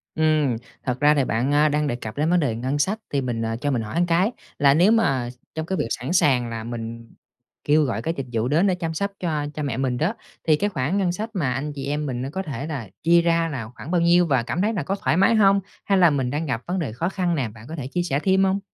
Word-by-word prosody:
Ừm, 155 -6 +2 0.3
thật 125 -1 -2
ra 150 0 +5
thì 140 -3 +2
bạn, 120 +5 0
a, 150 +1 +4
đang 150 0 0
đề 120 - -1
cập 110 -1 -7
đến 155 +2 +1
vấn 180 +1 +4
đề 135 -8 0
ngân 130 +5 -2
sách 200 +9 0
thì 140 - 0
mình, 120 -3 -2
ờ, 115 0 -1
cho 145 - 0
mình 125 -4 0
hỏi 155 +11 -1
cái 175 +6 +2 0.3
là 140 -1 +6
nếu 175 +8 +5
mà 135 - +2 0.3
trong 160 0 -3
cái 190 +3 -2
việc 150 - -1
sẵn 130 +7 -3
sàng 130 -9 +3
là 115 -1 -5
mình 115 0 -7 0.5
kêu 150 +1 +4
gọi 120 -5 -1
cái 165 +7 -1
dịch 135 - -3
vụ 115 +1 0
đến 160 +8 +3
để 185 - +2
chăm 165 -2 -3
sóc 200 +5 -2
cho 155 -5 -1
cha 150 - -4
mẹ 135 -5 -2
mình 130 -2 0
đó, 160 - 0 0.3
thì 155 - +6
cái 205 +7 0
khoản 155 +1 -1
ngân 190 -3 +1
sách 215 +5 -4
mà 145 - 0
anh 145 +3 -3
chị 140 -2 -6
em 145 +2 -2
mình 125 -3 -3
á 135 - -3
có 190 +6 -3
thể 145 -3 -5
là 135 -10 -5
chia 170 +1 +5
ra 165 -1 +2
là 125 -7 -5
khoảng 155 - -8
bao 175 -2 +2
nhiêu? 175 +1 +5
Và 135 -6 +2
cảm 160 +8 -2
thấy 215 +3 +1
nà 190 - -2
có 195 - -1
thoải 195 - 0
mái 195 +4 +4
hông 200 -2 +5 0.3
hay 195 - +3
là 175 -2 +6
mình 135 -4 0
đang 150 +5 -2
gặp 120 -6 -2
vấn 185 +2 -1
đề 155 -9 -2
khó 165 +9 -1
khăn 180 -3 -1
nào 130 -7 -1
bạn 110 0 -13
có 160 - -5
thể 140 -5 -5
chia 175 +6 -1
sẻ 140 -5 0
thêm 190 +3 +3
hông? 190 +1 +2
150 Hz, 290 wpm, -23 LUFS, 130-175 Hz, 0.5 s, là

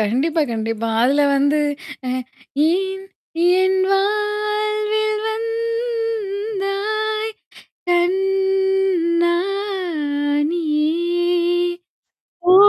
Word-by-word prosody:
கண்டிப்பா, 275 +10 +1
கண்டிப்பா. 225 0 -2
அதுல 280 +4 +3
வந்து, 285 +2 +2 0.5
அ - - 0 0.6
ஏன் 385 +2 -1 0.6
என் 375 0 +2
வாழ்வில் 425 +1 0
வந்தாய் 440 -2 -2 0.6
கண்ணா 385 -1 +2 1.2
நீ, 345 - -1 1.9
ஓ! - - +8
390 Hz, 55 wpm, -20 LUFS, 345-430 Hz, 1.9 s, ஓ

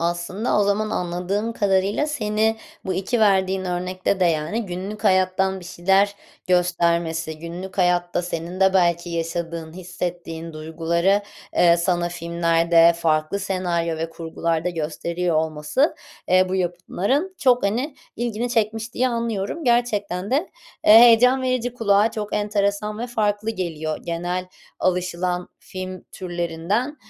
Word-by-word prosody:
Aslında 175 +6 -1
o - - +4
zaman 215 +2 0
anladığım 180 +6 -2
kadarıyla 200 +6 +1
seni 220 -5 0 0.3
bu 190 -1 -2
2 210 +5 -1
verdiğin 190 -2 +3
örnekte 185 +2 -2
de, - - +4
yani, 170 +7 0
günlük 190 +4 -6
hayattan 190 0 +2
bir - - -12
şeyler 195 +3 +2 0.3
göstermesi, 170 -3 +1
günlük 180 +3 -8
hayatta 175 0 +2
senin 175 +2 -5
de 190 0 +4
belki 175 -1 +2
yaşadığın, 165 -1 -4
hissettiğin 175 -2 -5
duyguları, 170 +5 0 0.3
eee, 170 -1 +5
sana 175 0 0
filmlerde, 170 0 +3
farklı 155 +3 0
senaryo 175 -4 -1
ve 165 +1 -3
kurgularda 165 +1 -2
gösteriyor 170 +1 -2
olması, 155 - +1 0.3
eee, 185 +1 +5
bu 190 - -2
yapımların 190 - -1
çok 250 -2 +3
hani, 250 +8 -1 0.2
ilgini 240 0 -2
çekmiş 225 0 -1
diye 255 +1 +2
anlıyorum. 230 +4 -3
Gerçekten 210 -6 0
de, 295 +8 0 0.4
eee, 210 - +9
heyecan 245 +2 +6
verici, 250 -1 0
kulağa 210 -1 +3
çok 210 -2 -4
enteresan 210 0 -1
ve 240 - -3
farklı 215 -2 -1
geliyor. 160 -6 -3
Genel 175 +2 -3 0.3
alışılan 180 0 -1
film 185 -1 -7
türlerinden, 175 - -2
185 Hz, 130 wpm, -22 LUFS, 170-210 Hz, 0.4 s, eee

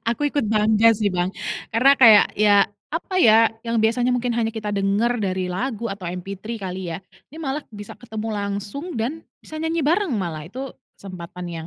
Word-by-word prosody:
Aku 290 +5 -1
ikut 285 -4 -1
bangga 220 +1 +4
sih 210 -2 +1
Bang, 180 +1 0 0.4
karena 265 +4 +6
kayak, 225 -5 +8
ya 205 -1 +5 0.2
apa 340 +4 -4
ya, 225 0 +7 0.2
yang 230 -1 -1
biasanya 240 +3 +2
mungkin 245 -1 0
hanya 225 -1 0
kita 215 -2 -4
denger 210 +4 +1
dari 185 -1 -1
lagu 230 +5 -3
atau 195 -4 -6
MP3 195 +5 -6
kali 185 -2 -5
ya, - - -5 0.3
ini 315 - -11
malah 295 -1 -3
bisa 205 -1 -9
ketemu 220 -2 -6
langsung 205 - -4
dan 285 +9 -3 0.2
bisa 310 - -13
nyanyi 325 +1 -1
bareng 355 +3 +2
malah, 170 -7 -3
itu 260 +5 -7 0.3
kesempatan 180 -2 -8
yang 165 -1 -6
220 Hz, 180 wpm, -22 LUFS, 195-245 Hz, 0.4 s, kayak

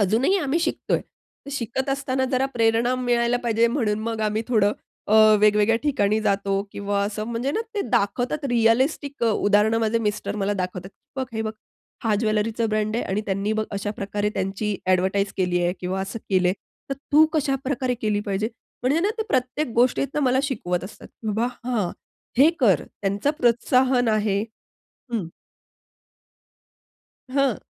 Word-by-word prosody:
अजूनही 230 - +3
आम्ही 300 -1 0
शिकतोय. 320 - 0 0.5
तर - - -7
शिकत 265 0 -3
असताना 270 -1 0
जरा 265 +1 +2
प्रेरणा 230 +1 +2
मिळायला 240 -1 +1
पाहिजे 230 0 +3
म्हणून 225 -5 0
मग 225 0 -3
आम्ही 215 +1 0
थोडं 210 -4 +3 0.4
अ, 210 - +3 0.3
वेगवेगळ्या 210 +1 +4
ठिकाणी 215 -8 +1
जातो 200 -1 0
किंवा 200 0 -1
असं 215 +1 -3
म्हणजे 235 +3 -2
ना, 440 - 0
ते 410 - 0
दाखवतात 245 +8 0
रिअलिस्टिक 245 +4 +2
उदाहरणं 215 0 +3
माझे 225 0 +1
मिस्टर 210 -1 -2
मला 200 0 0
दाखवतात. 185 -1 -4 0.3
"बघ, 265 - -1
हे 220 -1 -2
बघ. 220 -1 -3 0.5
हा 220 -2 +2
ज्वेलरीचा 220 +1 0
ब्रँड 215 0 0
आहे - - -1
आणि 195 +2 -1
त्यांनी 200 +2 -1
बघ 220 0 0
अशा 200 +1 -2
प्रकारे 205 +1 -1
त्यांची 195 +2 -2
ॲडव्हर्टाइज 190 +2 +1
केली 180 -2 +1
आहे" 175 - +1
किंवा 185 +1 -2
असं 195 +4 -4
केलंय. 185 -1 +3 0.4
तर - - 0 0.2
तू 310 +2 +8
कशाप्रकारे 270 -4 0
केली 210 -1 +1
पाहिजे? 200 +2 -1 0.3
म्हणजे 275 +6 +2
ना, 400 +4 +1
ते 440 - +1
प्रत्येक 260 +1 0
गोष्टीतनं 260 +4 +2
मला 255 0 +3
शिकवत 185 -11 -2
असतात. 195 - -11 0.2
बाबा, 220 +3 0 0.2
हां. 225 -8 0 0.5
"हे 290 +5 +7
कर." 195 - +4 0.2
त्यांचं 200 +7 +1
प्रोत्साहन 250 +1 +3
आहे. 210 -2 +1 0.7
हं. 215 -7 -1 2.1
हां. 275 -4 +1
220 Hz, 155 wpm, -24 LUFS, 205-255 Hz, 2.1 s, तू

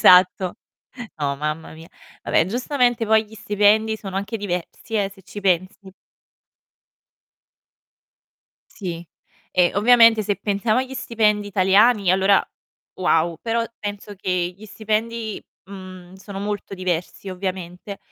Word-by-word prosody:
Esatto. 180 0 +5 0.6
No, 140 -2 -1
mamma 150 +2 -4
mia. 160 +1 -13 0.4
Vabbè, - - +2
giustamente 245 +2 +1
poi 220 0 +4
gli 220 - -14
stipendi 210 +1 +2
sono 195 -3 -7
anche 200 +3 -3
diversi, 200 +2 -5
eh, 200 -2 +1
se 195 - -18
ci 200 +3 -9
pensi. 190 +1 -1 2.8
Sì, 175 -4 -6 0.5
e 180 -1 +3
ovviamente 230 +1 +6
se 205 -1 -1
pensiamo 215 +3 0
agli 260 0 -6
stipendi 215 -5 +1
italiani 200 +1 +4
allora 190 +1 +4 0.5
wow. 170 -2 +1
Però 230 0 0
penso 205 0 -6
che 180 -2 -1
gli 215 - -13
stipendi, 220 +1 -3 0.2
mhmm, 185 -2 -11
sono 195 +1 -8
molto 205 -1 -4
diversi 180 +1 -3
ovviamente, 185 +1 -5
200 Hz, 120 wpm, -22 LUFS, 185-215 Hz, 2.8 s, ovviamente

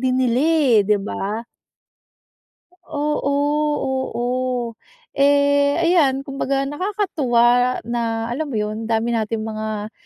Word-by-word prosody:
din 260 0 +1
nila, 245 0 +2
eh, 300 -7 +3
'di 210 -1 +3
ba? 210 +2 -4 1.4
Oo, 295 -2 -2 0.8
oo. 245 -1 -2 0.4
Eh, 285 +1 +3
ayan, 310 -6 +2
kumbaga 275 0 -1
nakakatuwa 270 - +1
na, 230 -1 -2
alam 295 +3 -3
mo 230 - -3
yun, 215 +1 -3
dami 230 +1 +1
nating 220 0 -2
mga 215 -1 -4
255 Hz, 105 wpm, -21 LUFS, 225-285 Hz, 1.4 s, eh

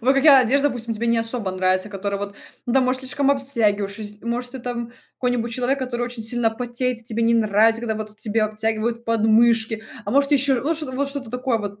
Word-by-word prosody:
вот 260 +3 +3
какая 275 0 +7
одежда, 280 +4 +2
допустим, 235 -3 -3
тебе 235 +2 -3
не 235 - +2
особо 225 -3 -2
нравится, 185 +1 +1
которая 200 0 -3
вот 200 0 -5 0.3
ну, 240 - -1
там 265 0 +4
может 255 +1 0
слишком 270 +2 0
обтягиваюш? 215 -8 +1
Если 210 0 -9
может 245 +1 -3
ты 265 - -6
там 235 -1 -5 0.3
какой-нибудь 245 -2 -1
человек, 255 +3 0
который 250 -2 -3
очень 240 -1 -5
сильно 230 0 0
потеет 245 +1 -2
и - - -22
тебе 230 0 -2
не 230 0 +3
нравится, 225 +1 +3
когда 225 -2 -2
вот 215 0 -7
тебе 215 +1 -1
обтягивают 220 +2 -2
подмышки? 225 0 +2 0.2
А 205 - -4
может 280 +3 +3
еще 270 -2 +3
вот 315 +5 0
что-то 300 -4 -5
вот 275 +2 -1
что-то 275 -5 -5
такое 250 -1 -1
вот 205 -1 -6
235 Hz, 220 wpm, -22 LUFS, 220-255 Hz, 0.3 s, какая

